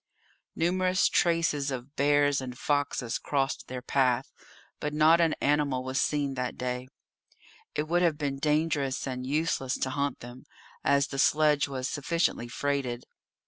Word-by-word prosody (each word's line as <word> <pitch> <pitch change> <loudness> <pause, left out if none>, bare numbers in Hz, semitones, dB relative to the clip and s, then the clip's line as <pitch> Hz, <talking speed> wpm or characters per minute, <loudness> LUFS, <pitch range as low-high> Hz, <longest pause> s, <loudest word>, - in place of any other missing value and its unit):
Numerous 185 +2 +2
traces 165 -4 +1
of 130 +2 -6
bears 145 -1 +3
and 125 -1 -7
foxes 145 -4 -1
crossed 135 -2 -1
their 125 -1 -6
path, 130 -1 +1 0.5
but 150 0 -3
not 160 +2 +5
an 165 -2 +2
animal 140 -3 +1
was 130 +1 -1
seen 145 -2 0
that 125 -1 -3
day. 125 0 -3 0.9
It 150 - 0
would 175 +2 +2
have 165 -4 +2
been 140 -2 -2
dangerous 150 -2 0
and 130 -1 -4
useless 140 -3 0
to 130 - -2
hunt 140 0 -2
them, 120 +2 -11 0.4
as 140 -1 +2
the 135 - -4
sledge 150 0 +3
was 130 -2 -3
sufficiently 150 -3 -1
freighted. 130 -1 -2
140 Hz, 145 wpm, -28 LUFS, 130-150 Hz, 0.9 s, not